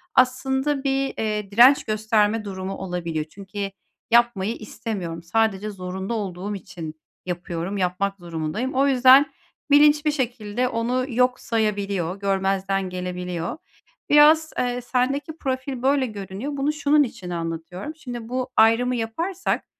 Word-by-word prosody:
aslında 265 +2 +2
bir, 275 0 +1
eee, 210 -2 -2
direnç 245 +6 +7
gösterme 215 0 +1
durumu 190 -1 -5
olabiliyor. 170 -4 -3
Çünkü 195 +4 -6 0.4
yapmayı 235 -3 +3
istemiyorum, 190 -7 -5
sadece 210 +2 0
zorunda 190 +1 -5
olduğum 200 -1 -4
için 170 -5 -8 0.3
yapıyorum, 175 +1 -4
yapmak 195 +2 -1
durumundayım. 170 - -3
O 270 +2 +3
yüzden 265 +1 +6 0.4
bilinç 295 +1 +6
bir 300 - +3
şekilde 245 -4 -2
onu 245 +2 -1
yok 250 +1 +2
sayabiliyor, 200 -5 -1
görmezden 195 -1 0
gelebiliyor. 180 - -4 0.5
Biraz, 310 +2 +6
eee, 245 0 -1
sendeki 270 +6 -1
profil 260 -2 -3
böyle 270 +1 +3
görünüyor. 210 +5 -6
Bunu, 280 +2 0
şunun 300 -1 +3
için 230 -8 -7
anlatıyorum. 170 - -5
Şimdi 245 -6 -7
bu 255 +1 -2
ayrımı 230 +3 +4
yaparsak, 330 - -2
220 Hz, 125 wpm, -23 LUFS, 190-260 Hz, 0.5 s, direnç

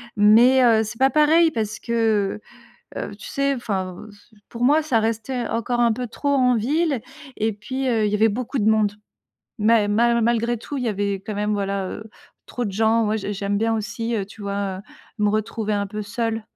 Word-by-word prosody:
Mais, 235 +5 +6
heu, 225 -2 +4
c'est 220 +2 -7
pas 265 +2 +3
pareil 315 +2 +4
parce 215 -4 -3
que, 220 -4 0 0.6
heu, - - -4
tu - - -10
sais, 275 0 0
enfin, 190 -5 -4
c 205 +2 -21
pour 240 +1 -3
moi 300 +4 +4
ça 260 -7 +1
restait 230 +2 -2
encore 240 +1 -1
un 235 -1 +4
peu 250 +2 -4
trop 285 +5 -4
en 255 -3 +3
ville. 280 +2 0 0.3
Et 220 +1 0
puis, 260 +6 -4
heu, 225 -3 +2
il - - 0
y - - +1
avait 220 +2 +4
beaucoup 250 +4 -3
de 215 +1 +3
monde. 215 -2 +2 0.7
Ma 215 -1 +3
ma 235 +3 +2
malgré 235 +1 +1
tout, 275 +5 -6
il 250 - -3
y - - -1
avait 200 -1 -1
quand 215 - -4
même, 210 +1 -1
voilà, 195 -1 -2
heu, 215 - -7 0.4
trop 245 - -4
de 200 - -3
gens, 225 +2 +2
moi, 215 +1 0
j'ai 205 -1 -3
j'aime 200 +1 -2
bien 225 +2 +1
aussi, 225 +2 -3
heu, 200 - -1
tu 210 +2 -14
vois, 200 -1 -3 0.4
me 210 -1 +2
retrouver 215 0 -2
un 200 -1 -1
peu 210 +1 -5
seule. 225 +1 -2
225 Hz, 210 wpm, -22 LUFS, 210-240 Hz, 0.7 s, Mais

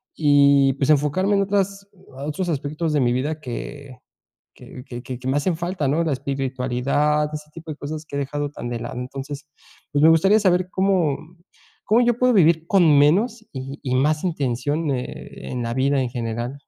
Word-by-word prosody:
y 140 -2 +4
pues 140 +1 -1
enfocarme 150 +7 +2
en 200 - +3
otras 200 0 -1 0.4
otros 175 +4 -2
aspectos 150 +1 -2
de 145 - +2
mi 120 - +2
vida 150 +5 -2
que 135 +1 -7 0.6
que 125 - -11
que 120 0 -7
que 125 -2 -6
que 130 - -7
me 130 - +1
hacen 165 +3 0
falta, 170 -2 -3
¿no?, 150 +5 +1
la 160 - 0
espiritualidad, 135 +2 0
ese 150 0 -7
tipo 165 -1 -8
de 150 - -7
cosas 155 +2 -6
que 140 - -8
he - - 0
dejado 145 +2 -3
tan 120 - -5
de 120 -1 -3
lado, 120 +2 -6
entonces, 135 +3 -6 0.5
pues 145 - +1
me 160 - +8
gustaría 195 +7 +4
saber 185 -3 +2
cómo 185 -7 +2 0.7
cómo 225 +3 +4
yo 240 - +4
puedo 250 0 +4
vivir 165 -4 +4
con 195 -3 +5 0.2
menos 185 +12 +4 0.2
y 130 - -5 0.2
y 130 -1 -1
más 150 +4 +1
intención, 145 -4 -1
eh, 125 -2 -6
en 125 -1 -3
la 115 0 -2
vida 135 +2 +1
en 125 - -1
general. 120 0 -4
145 Hz, 190 wpm, -22 LUFS, 130-165 Hz, 0.7 s, me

